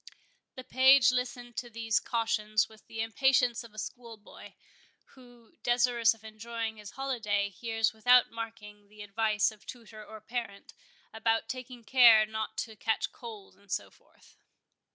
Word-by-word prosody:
The 255 - -8
page 260 0 +6
listened 245 -1 -4
to 240 - -4
these 225 -2 0
cautions 215 -2 0
with 220 -1 -18
the 225 - -5
impatience 245 +1 +2
of 230 - -13
a 215 - -19
schoolboy, 225 -1 -9 0.6
who, 245 -3 -19
desirous 240 -1 +3
of 220 - -23
enjoying 220 +1 -5
his 210 -2 -10
holiday, 215 -7 -2
hears 225 +2 -1
without 245 +3 +4
marking 220 -3 -8
the 210 0 -11
advice 215 +1 +1
of 215 -1 -18
tutor 225 -3 -10
or 220 +1 -11
parent, 215 -2 -6 0.4
about 225 0 0
taking 250 0 -8
care 230 -3 +7
not 220 0 -5
to 220 -1 -14
catch 220 +1 -1
cold, 220 -5 -11
and 200 0 -20
so - - -3
forth. - - -25
225 Hz, 150 wpm, -30 LUFS, 215-240 Hz, 0.6 s, care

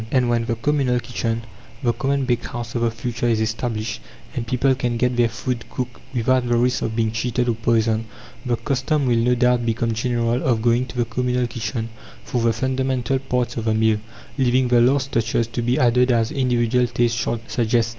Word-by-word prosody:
And 125 -2 +2
when 115 -1 +1
the 115 0 -1
communal 130 0 +1
kitchen 115 -2 -3 0.4
the 120 -1 +2
common 135 +3 0
bakehouse 120 -1 -3
of 120 - -1
the 115 - +2
future 120 +1 -3
is 115 -2 +2
established, 110 - -2 0.3
and 115 -2 -3
people 130 +3 +2
can 125 -2 -1
get 125 +1 +1
their 120 -1 +3
food 120 +1 -3
cooked 125 -2 -5
without 125 +1 +2
the 120 0 +2
risk 125 +1 +1
of 110 - -2
being 110 -1 +1
cheated 120 +2 -1
or 120 - +2
poisoned, 115 0 +1 0.4
the 120 -2 0
custom 135 +3 0
will 120 -2 +2
no 125 +2 +3
doubt 125 0 +2
become 115 0 0
general 120 +1 0
of 115 -4 +1
going 120 +1 +2
to 125 - -9
the 120 - +2
communal 125 +2 0
kitchen 115 -1 -4 0.3
for 125 -3 -2
the 115 0 +3
fundamental 130 +1 0
parts 125 -3 -2
of 115 - -3
the 110 -1 +2
meal, 110 -1 +2 0.4
leaving 130 0 +3
the 120 -1 +5
last 135 +2 +2
touches 115 0 +1
to 115 +1 -4
be 120 +2 +1
added 125 +1 +3
as 115 0 +2
individual 125 -3 +1
taste 120 0 +1
shall 120 0 -1
suggest. 115 0 +1
120 Hz, 200 wpm, -22 LUFS, 115-125 Hz, 0.4 s, the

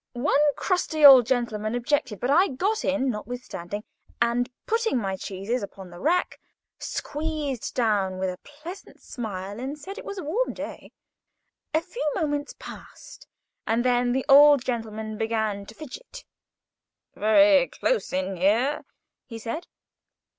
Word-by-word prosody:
One 280 +3 +2
crusty 325 -5 +1
old 260 -4 +10
gentleman 225 -3 -1
objected, 245 -3 -1
but 250 - 0
I 360 +7 +5
got 395 - -1
in, 275 -2 +1
notwithstanding; 210 -4 -6 0.4
and, 235 +1 +1 0.2
putting 455 - +1
my 195 -5 -1
cheeses 200 +6 -3
upon 195 -2 -9
the 175 - -11
rack, 350 - 0 0.4
squeezed 295 -4 -4
down 205 -6 +1
with 185 0 -1
a 180 - -10
pleasant 320 +7 -11
smile, 205 -4 -6
and 270 +4 -4
said 390 +9 -8
it - - -9
was 400 - -7
a 370 - -4
warm 415 +13 -1
day. - - -8 0.8
A 315 - +3
few 365 +8 -6
moments 290 -4 -2
passed, - - -12 0.4
and 230 +2 +1
then 245 -1 +2
the 260 +1 0
old 285 -1 +7
gentleman 220 -3 -4
began 220 -3 -1
to 220 - -12
fidget. 480 - -10 0.9
"Very 280 +5 +5
close - - -1
in 185 +1 -2
here," 225 +11 +2 0.4
he 230 - -7
said. 230 +10 -5
250 Hz, 140 wpm, -25 LUFS, 215-300 Hz, 0.9 s, old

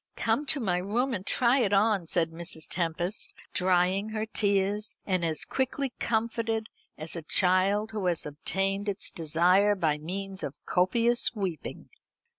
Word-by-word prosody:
Come 295 - 0
to 295 - +4
my 190 -7 0
room 235 +8 -1
and 195 -2 -4
try 250 +2 +4
it 205 -5 +1
on," 200 -3 +2
said 165 -1 +1
Mrs. 165 -1 -2
Tempest, 175 +3 -2 0.2
drying 185 +2 +2
her 215 0 -3
tears, 205 0 0
and 185 -3 0
as 160 -2 -1
quickly 265 0 -2
comforted 225 -1 -1 0.3
as 155 +2 -4
a 170 - -4
child 190 +6 +2
who 210 -4 -2
has 175 -2 0
obtained 195 +7 -2
its 200 0 -2
desire 180 +6 +3
by 155 -5 0
means 190 +4 -5
of 140 - -5
copious 235 +7 +2
weeping. 185 -8 -5
195 Hz, 150 wpm, -28 LUFS, 175-220 Hz, 0.3 s, to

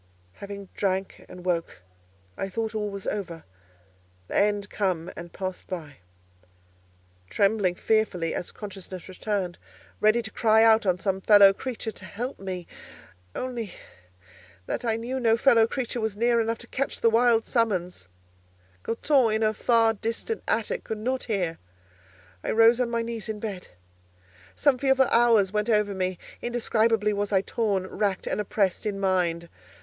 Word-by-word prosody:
Having 200 - -9
drank 190 -1 -2
and 180 0 -11
woke, 170 - -2 0.5
I 195 - -3
thought 220 +2 -3
all 210 -1 -2
was 200 -1 -7
over: 170 -6 -4 0.9
the - - -5
end 205 0 +2
come 180 -5 -1
and 170 0 -9
past 185 -1 -5
by. 155 -7 -7 1.3
Trembling 200 -3 +2
fearfully—as 180 -6 0
consciousness 190 -3 -8
returned—ready 205 +3 -2
to 220 - -7
cry 220 -1 +4
out 220 -2 +5
on 180 -1 +3
some 190 +2 -1
fellow 200 -1 +7
creature 230 0 -5
to 190 - -12
help 245 +8 -5
me, 185 -2 -5 0.7
only 240 -5 -4 0.9
that - - -3
I 225 -2 +1
knew 240 +4 -3
no 230 -2 +3
fellow 230 -3 +5
creature 245 -1 -3
was 220 -2 -2
near 235 +1 +3
enough 225 0 -1
to 235 - -13
catch 275 - -3
the 230 - +4
wild 230 0 +4
summons—Goton 95 - -2
in 220 - -1
her 215 0 +2
far 225 0 +3
distant 230 - -3
attic - - -1
could 220 - -4
not 255 +4 -2
hear—I 90 - -7
rose 230 +2 +5
on 245 - 0
my 235 0 -1
knees 230 -1 -5
in 215 -1 -4
bed. 205 -4 -5 0.9
Some 280 -4 +2
fearful 265 -1 +4
hours 230 -5 +4
went 210 +2 -1
over 210 -2 +2
me: 185 -1 -2 0.2
indescribably 225 -3 +1
was 205 0 -2
I 190 -2 +3
torn, 200 -2 -1
racked 195 0 -2
and - - -1
oppressed 200 0 0
in 200 -1 -3
mind. 175 -3 0
210 Hz, 145 wpm, -26 LUFS, 185-230 Hz, 1.3 s, fellow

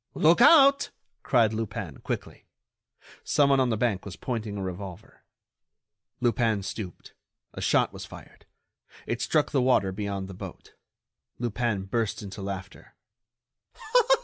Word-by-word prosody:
"Look 165 +7 +4
out!" 275 0 +7 0.3
cried 115 -4 +3
Lupin, 110 -1 -4
quickly. - - -6 0.8
Someone 140 -2 +3
on 130 -1 +2
the 110 - 0
bank 105 -4 0
was 100 -2 -8
pointing 110 -4 -4
a 100 - -3
revolver. 95 +2 -8 1.0
Lupin 115 -4 +1
stooped, 95 -3 -7 0.4
a - - -7
shot - - +2
was - - -8
fired; - - -13 0.6
it 115 +1 -3
struck 150 -2 +1
the 135 - +2
water 125 -7 +3
beyond 100 -1 -4
the 95 - -9
boat. 90 - -10 0.6
Lupin 120 -3 -1
burst 110 +2 -2
into 100 0 -8
laughter. 95 -1 -7
110 Hz, 125 wpm, -27 LUFS, 95-125 Hz, 1.0 s, out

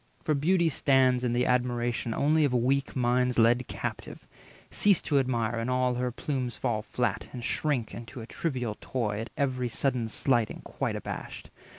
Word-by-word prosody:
For 155 - +1
Beauty 170 +4 +2
stands 135 -4 +3
220 125 - 0
In 120 - 0
the 125 +1 +2
admiration 120 -2 -1
only 155 +2 +3
of 135 -4 +2
weak 135 +3 +1
minds 125 0 +1
Led 120 +2 +4
captive; - - -6 0.5
cease 205 -3 +4
to 145 -3 +2
admire, 120 -3 0
and 115 +2 -2
all 125 0 +2
her 125 0 -1
plumes 125 -1 -3
Fall 110 -2 -1
flat, 120 +3 -2
and 120 - -7
shrink 130 -3 -1
into 120 +2 -8
a 110 - -7
trivial 125 -6 -3
toy, 105 -5 -2
At 115 - -5
every 130 -3 0
sudden 120 -1 -1
slighting 120 -2 0
quite - - -3
abashed. - - -7
125 Hz, 175 wpm, -28 LUFS, 120-135 Hz, 0.5 s, Led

